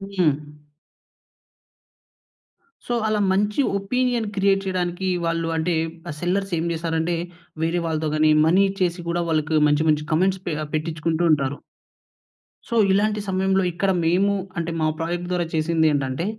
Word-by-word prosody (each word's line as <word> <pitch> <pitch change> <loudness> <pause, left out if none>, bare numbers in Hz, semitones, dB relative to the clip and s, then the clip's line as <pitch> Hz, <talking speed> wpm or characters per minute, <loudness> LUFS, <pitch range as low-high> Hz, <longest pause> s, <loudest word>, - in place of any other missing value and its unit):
హ్మ్. 175 -5 +4 2.5
సో, 240 - -2
అలా 215 -1 +1
మంచి 205 +4 0 0.2
ఒపీనియన్ 245 +2 0
క్రియేట్ 195 0 +2
చేయడానికి 185 0 -2 0.2
వాళ్ళు 165 0 -1
అంటే 165 +2 0 0.3
ఆ - - -2
సెల్లర్స్ 190 +2 -1
ఏం - - -1
చేసారంటే 165 +1 -1 0.5
వేరే 170 +1 0
వాళ్ళతో 160 -1 -1
గాని 155 0 +4
మనీ 180 +5 +4
ఇచ్చేసి 185 -2 -1
కూడా 175 +1 0
వాళ్ళకి 155 0 +1
మంచి 150 +2 +2
మంచి 150 0 +1
కామెంట్స్ 185 +3 +1
పె 170 - 0 0.2
పెట్టించుకుంటూ 160 +1 -1
ఉంటారు. 140 -1 -1 1.1
సో 235 - -2 0.2
ఇలాంటి 210 +2 +2
సమయంలో 190 0 +1
ఇక్కడ 190 +3 +1
మేము 190 +5 +3 0.2
అంటే 170 0 -2
మా 155 - +2
ప్రాజెక్ట్ 175 +2 -3
ద్వారా 175 -1 0
చేసిందేంటంటే 155 -3 +1
175 Hz, 130 wpm, -23 LUFS, 160-195 Hz, 2.5 s, హ్మ్